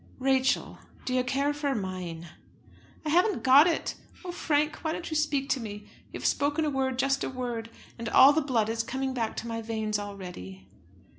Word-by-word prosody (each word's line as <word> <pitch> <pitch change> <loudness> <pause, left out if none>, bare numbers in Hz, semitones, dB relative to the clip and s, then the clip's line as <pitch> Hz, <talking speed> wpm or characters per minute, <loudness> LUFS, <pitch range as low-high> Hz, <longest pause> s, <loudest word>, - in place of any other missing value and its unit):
"Rachel, 265 0 +1 0.3
do 255 - -2
you 255 0 +2
care 275 +3 0
for 290 -2 -1
mine?" 180 -5 -5 0.8
"I - - -1
haven't 360 +6 +2
got 275 +5 +7
it! 335 - -1 0.3
Oh, 360 - -3
Frank, 300 -3 0
why 315 -1 -2
don't 340 - -5
you - - -2
speak 290 -3 +1
to 270 - +1
me? 210 -2 -7 0.3
You - - -6
have - - -7
spoken 290 +2 +1
a 300 - 0
word, 265 -1 -1
just 270 +1 +1
a - - -2
word, 240 -3 -4 0.3
and 230 -1 -3
all 275 +2 +8
the 315 - +2
blood 245 -7 +1
is 225 0 -1
coming 265 +3 -3
back 230 -3 -2
to 235 - -4
my 230 0 -3
veins 220 -2 -2
already." 180 - -8
260 Hz, 200 wpm, -28 LUFS, 220-290 Hz, 0.8 s, all